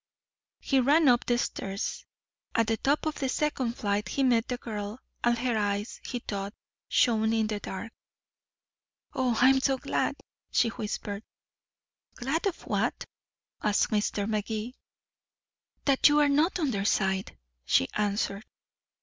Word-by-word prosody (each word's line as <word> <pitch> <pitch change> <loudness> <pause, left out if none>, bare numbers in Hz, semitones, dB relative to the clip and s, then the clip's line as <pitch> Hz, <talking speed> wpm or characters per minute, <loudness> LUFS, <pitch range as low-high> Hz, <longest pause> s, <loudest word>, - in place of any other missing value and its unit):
He 270 - +2
ran 290 +5 +4
up 245 -2 +4
the 240 - +3
stairs. 195 -4 -3 0.5
At 230 - +4
the 225 0 0
top 285 +6 +1
of 310 -1 -2
the 270 -2 0
second 265 -4 0
flight 205 -2 -1
he 275 - 0
met 240 -3 +3
the 250 - -2
girl, 210 -2 -5 0.3
and 240 0 +3
her 245 0 0
eyes, 205 0 -1
he 250 - -4
thought, 200 -3 -5 0.3
shone 220 -2 +3
in 225 -1 +2
the 215 -1 -2
dark. 205 +3 -6 1.2
"Oh, 250 -3 +1
I'm 265 +2 +6
so 270 0 +2
glad," - - -1 0.3
she 230 - +3
whispered. 210 -2 -4 0.9
"Glad 275 +10 -1
of 370 - -4
what?" - - -1 0.6
asked 210 -1 +2
Magee. 215 +2 -1 1.1
"That 275 +1 +5
you 295 0 +4
are 295 -1 +4
not 305 +7 +3
on 300 -6 +1
their 200 -3 -1
side," 190 -1 0 0.3
she 85 - +3
answered. 205 -1 -1
Mr. - - -45
230 Hz, 145 wpm, -28 LUFS, 210-265 Hz, 1.2 s, I'm